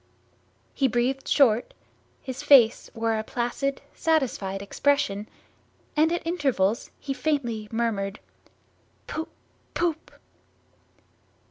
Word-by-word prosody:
He 270 - +2
breathed 255 +3 0
short, 240 -5 +3 0.5
his 260 +1 -5
face 270 -6 +6
wore 225 -1 0
a - - -3
placid 245 +5 -2
satisfied 260 - 0
expression, 205 -1 0 0.7
and 315 +2 +4
at 345 -1 -2
intervals 270 - 0
he 275 - -3
faintly 255 -8 -1
murmured 215 -3 -1 0.9
"Poop 320 +1 -4 0.5
poop!" 330 -2 -1
255 Hz, 95 wpm, -26 LUFS, 220-290 Hz, 0.9 s, face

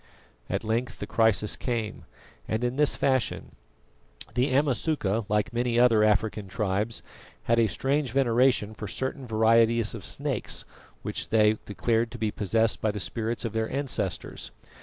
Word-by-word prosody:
At - - -1
length 115 +3 -1
the - - -5
crisis 110 -2 +2
came, 115 -4 -3 0.4
and 110 +2 -1
in 125 +1 0
this 150 0 +3
fashion. 130 -4 0 0.8
The 125 +3 +1
Amasuka, 130 -5 +1
like 105 +1 0
many 120 0 0
other 115 -3 +5
African 105 -1 +1
tribes, 105 +3 -2 0.4
had 115 0 +2
a 115 - +4
strange 135 +7 0
veneration 125 -4 +2
for 105 0 -7
certain 130 +4 -3
varieties 115 0 +3
of - - -7
snakes - - -2 0.4
which - - -3
they 110 -1 +4
declared 115 +2 0
to - - -6
be 110 -2 -1
possessed 110 +3 +1
by 110 - +1
the 105 0 -3
spirits 115 +4 -2
of 115 - -3
their 110 0 -1
ancestors. 140 0 -3
115 Hz, 150 wpm, -27 LUFS, 110-125 Hz, 0.8 s, other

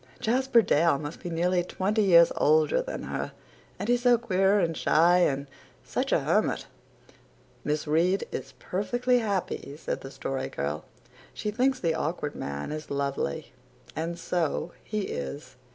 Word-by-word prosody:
Jasper 250 0 +3
Dale 165 -3 +3
must 145 +3 -6
be 175 - -5
nearly 175 +2 +1
twenty 200 +4 0
years 170 -4 +6
older 155 - +3
than - - -5
her - - -4 0.4
and 200 - -4
he's 245 0 +2
so 245 -1 +5
queer 195 -3 +2
and 165 -3 0
shy 175 +4 +4
and 140 -5 +1 0.4
such - - -2
a - - +3
hermit." - - +1 1.0
"Miss 150 0 -1
Reade 170 +6 +2
is 135 +1 -6
perfectly 245 - 0
happy," 195 -9 -3
said - - -4
the 135 - -8
Story 135 0 -4
Girl. 75 +2 -3 0.5
"She 210 - -2
thinks 255 +4 +1
the 165 -2 +1
Awkward 155 -2 -2
Man 70 - -5
is 155 0 -6
lovely 140 - -2 0.4
and 165 +2 -3
so 170 0 -1
he 215 0 -2
is. 70 - -5
170 Hz, 150 wpm, -27 LUFS, 150-210 Hz, 1.0 s, years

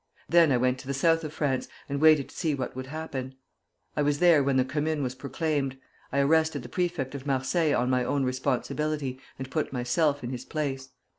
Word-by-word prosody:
Then 170 -3 +5
I 125 - +4
went 125 +1 +1
to 130 - -11
the 140 - -2
South 165 +3 +3
of 155 - -4
France, 140 -4 -1 0.2
and 140 0 -3
waited 155 -3 +5
to - - -15
see 160 -5 0
what 130 -3 -4
would 130 0 -5
happen. 135 -3 -5 0.6
I - - +1
was 145 0 +2
there 170 -3 +5
when 135 -1 +2
the 130 - +3
Commune 150 +2 -1
was 125 -1 -2
proclaimed. 140 0 -2 0.3
I 140 - +2
arrested 155 -1 +2
the 120 - -9
prefect 175 -5 -2
of 140 0 -7
Marseilles 145 +4 +1
on 125 +1 +1
my 125 -1 +2
own 140 +2 0
responsibility, 130 +2 -1 0.2
and 130 0 -7
put 155 - -1
myself 140 +3 +1
in 120 - -4
his 125 - -5
place. 135 -4 -3
140 Hz, 210 wpm, -27 LUFS, 130-155 Hz, 0.6 s, Then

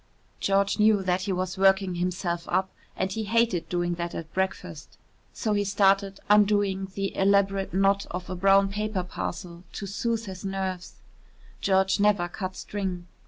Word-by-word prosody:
George 200 +1 +1
knew 210 -2 +4
that 180 0 0
he 195 +1 -2
was 185 0 -3
working 190 -1 +4
himself 175 -1 -2
up 190 +1 0 0.3
and 190 0 -1
he 220 +1 -3
hated 225 -5 +1
doing 175 0 0
that 170 0 -4
at 160 -1 -7
breakfast. 180 -4 -4 0.3
So 215 -3 -2
he 205 0 +1
started 195 0 +2
undoing 205 -2 +3
the 195 0 -3
elaborate 195 0 +2
knot 195 +2 +2
of 180 +1 -5
a 185 - -4
brown 195 +2 +4
paper 210 -1 -2
parcel 175 -1 -6
to 200 - -5
soothe 230 +3 -2
his 190 -2 -8
nerves 190 -2 -4 0.7
George 190 0 +2
never 200 -4 +3
cut 185 +1 -5
string. 190 -4 -4
195 Hz, 160 wpm, -26 LUFS, 180-200 Hz, 0.7 s, knew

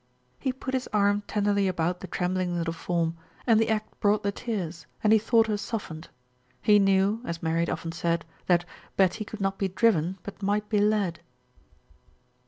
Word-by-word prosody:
He 265 - 0
put 260 +1 -6
his 260 -1 -1
arm 205 -1 +3
tenderly 205 -1 +1
about 180 -1 0
the 190 - -7
trembling 180 0 -1
little 165 -1 -1
form, 165 0 -1 0.3
and 225 -3 +5
the 225 - +2
act 215 -1 -2
brought 205 +1 +2
the 200 - +1
tears 180 -9 -4 0.2
and 215 0 +5
he 220 - +6
thought 225 +1 +4
her 215 -2 -1
softened. 200 -7 -5 0.5
He 210 +8 +5
knew, 195 +2 +3
as 170 -7 -5
Mary 165 0 +1
had 170 - +1
often 165 - -3
said, 170 -1 -1 0.2
that 175 -1 +3 0.3
"Betty 195 +3 +3
could 215 0 -8
not 195 0 -1
be 195 - +1
driven, 190 -3 +2
but 200 - -9
might 205 +1 0
be 210 - +2
led." 205 -5 +1
195 Hz, 185 wpm, -27 LUFS, 175-215 Hz, 0.5 s, he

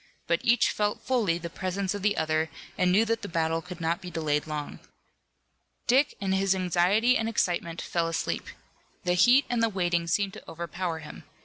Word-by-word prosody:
But 170 0 +1
each 240 0 +4
felt 210 0 -1
fully 230 -9 +1
the 170 0 -6
presence 185 +3 -3
of 205 - -5
the 205 +1 +1
other 160 0 0 0.3
and 180 -1 +2
knew 210 +5 +4
that 230 0 -1
the 205 - -5
battle 165 -1 0
could 180 0 -9
not 165 +1 -1
be 180 - -7
delayed 155 -3 -1
long. 150 -1 -5 1.1
Dick, 270 +4 +3
in 195 -1 -1
his 190 0 +2
anxiety 185 +7 +3
and 225 -2 0
excitement, 170 -5 -1
fell 170 -1 -1
asleep. 165 0 -2 0.6
The 180 -1 +1
heat 245 +10 +5
and 240 -2 0
the 230 - +3
waiting 175 -4 0
seemed 195 +3 0
to - - -11
overpower 170 +1 -4
him. 150 - -10
180 Hz, 190 wpm, -27 LUFS, 165-210 Hz, 1.1 s, heat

